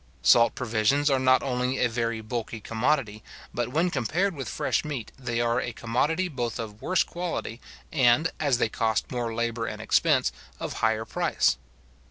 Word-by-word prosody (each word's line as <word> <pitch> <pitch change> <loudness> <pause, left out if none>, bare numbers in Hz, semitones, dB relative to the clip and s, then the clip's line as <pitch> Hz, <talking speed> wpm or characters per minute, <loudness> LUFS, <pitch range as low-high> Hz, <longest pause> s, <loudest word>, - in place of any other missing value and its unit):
Salt 115 -1 +5
provisions 125 +5 +1
are 135 - +3
not 130 0 +4
only 125 0 -1
a 125 - +3
very 115 -1 -2
bulky 115 0 -4
commodity, 115 -1 0 0.3
but 120 -1 -1
when 165 +7 +1
compared 180 - 0
with 135 -7 -5
fresh - - 0
meat 145 -7 -5
they 120 -3 -3
are 120 +1 +1
a 120 - -4
commodity 145 +12 0
both 120 -8 -3
of 110 -2 -7
worse 185 0 +2
quality, 170 -9 -4 0.3
and, 135 0 +4
as 140 -5 +2
they 120 - +2
cost 110 0 -1
more 120 -2 -2
labour 115 0 -2
and - - -5
expense, - - +2 0.3
of - - -4
higher 110 0 +1
price. - - +1
120 Hz, 170 wpm, -26 LUFS, 115-140 Hz, 0.3 s, Salt